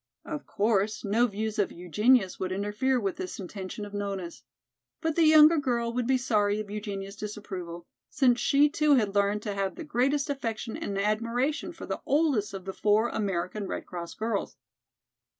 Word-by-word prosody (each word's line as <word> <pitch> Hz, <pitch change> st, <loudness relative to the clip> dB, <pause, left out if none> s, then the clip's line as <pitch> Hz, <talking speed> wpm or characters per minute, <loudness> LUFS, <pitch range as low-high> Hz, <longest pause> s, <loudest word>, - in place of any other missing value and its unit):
Of 305 Hz, -3 st, -6 dB
course, 215 Hz, +1 st, 0 dB
no 225 Hz, +5 st, +3 dB
views 215 Hz, 0 st, -3 dB
of 200 Hz, -, +1 dB
Eugenia's 195 Hz, +4 st, +2 dB
would 185 Hz, 0 st, -2 dB
interfere 210 Hz, +7 st, 0 dB
with 195 Hz, -4 st, -2 dB
this 185 Hz, -, -5 dB
intention 195 Hz, +2 st, -6 dB
of 205 Hz, -, -11 dB
Nona's. 195 Hz, -4 st, -4 dB, 0.6 s
But 320 Hz, -1 st, -1 dB
the 335 Hz, -, +4 dB
younger 310 Hz, +1 st, +7 dB
girl 235 Hz, -4 st, -1 dB
would 245 Hz, -1 st, -1 dB
be 265 Hz, 0 st, +3 dB
sorry 210 Hz, -4 st, +1 dB
of 210 Hz, -1 st, -6 dB
Eugenia's 200 Hz, -2 st, -5 dB
disapproval, 190 Hz, -5 st, -7 dB, 0.2 s
since 250 Hz, -5 st, +3 dB
she 285 Hz, +1 st, +4 dB
too 300 Hz, -1 st, +3 dB
had 210 Hz, -6 st, +1 dB
learned 205 Hz, +1 st, +1 dB
to 205 Hz, -, -3 dB
have 195 Hz, -1 st, -2 dB
the -, -, -7 dB
greatest 285 Hz, 0 st, +1 dB
affection 230 Hz, -6 st, -3 dB
and 200 Hz, -, -4 dB
admiration 230 Hz, -, 0 dB
for -, -, -9 dB
the -, -, -4 dB
oldest 275 Hz, -9 st, +2 dB
of 190 Hz, -1 st, -8 dB
the 190 Hz, -, -4 dB
four 215 Hz, +4 st, +2 dB
American 195 Hz, 0 st, -2 dB
Red -, -, -4 dB
Cross 170 Hz, -2 st, -7 dB
girls. 220 Hz, -7 st, -2 dB
215 Hz, 175 wpm, -28 LUFS, 200-250 Hz, 0.6 s, younger